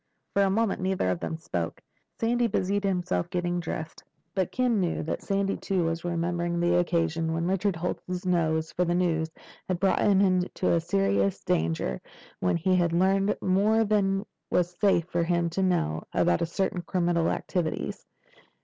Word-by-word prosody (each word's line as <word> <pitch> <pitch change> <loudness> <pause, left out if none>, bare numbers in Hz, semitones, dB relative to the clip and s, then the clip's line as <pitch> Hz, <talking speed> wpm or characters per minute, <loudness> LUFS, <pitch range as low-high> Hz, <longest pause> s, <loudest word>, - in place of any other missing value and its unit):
For 200 - +3
a 195 - +4
moment 215 0 0
neither 185 - 0
of 90 - -2
them 160 - -4
spoke. 85 - -4 0.4
Sandy 240 +1 +2
busied 200 -1 0
himself 180 - 0
getting 175 0 -1
dressed. 160 -2 -5 0.3
But 190 -3 -1
Ken 250 -4 +1
knew 175 -3 -1
that 160 - -3
Sandy 195 0 0
too 190 -3 -1
was 165 0 -2
remembering 170 0 -1
the 175 0 +2
occasion 165 -2 0
when 165 +1 -1
Richard 195 +1 +1
Holt's 180 +2 -4
nose 160 -3 +1
for 180 - 0
news 170 -2 +1 0.4
had 185 -2 -1
brought 195 0 +2
him 200 -2 +4
into 185 -2 +2
serious 100 - +1
danger, 80 -6 0 0.4
when 90 - +1
he 185 +3 +2
had 175 -2 +2
learned 195 +3 +2
more 210 +4 +3
than 200 -2 +1 0.2
was 175 0 +1
safe 195 -5 +3
for 170 -1 -1
him 170 0 0
to 190 - -1
know 80 - +1
about 85 - +2
certain 185 +1 -1
criminal 175 -2 +1
activities. 175 -4 -2
175 Hz, 160 wpm, -27 LUFS, 165-195 Hz, 0.4 s, a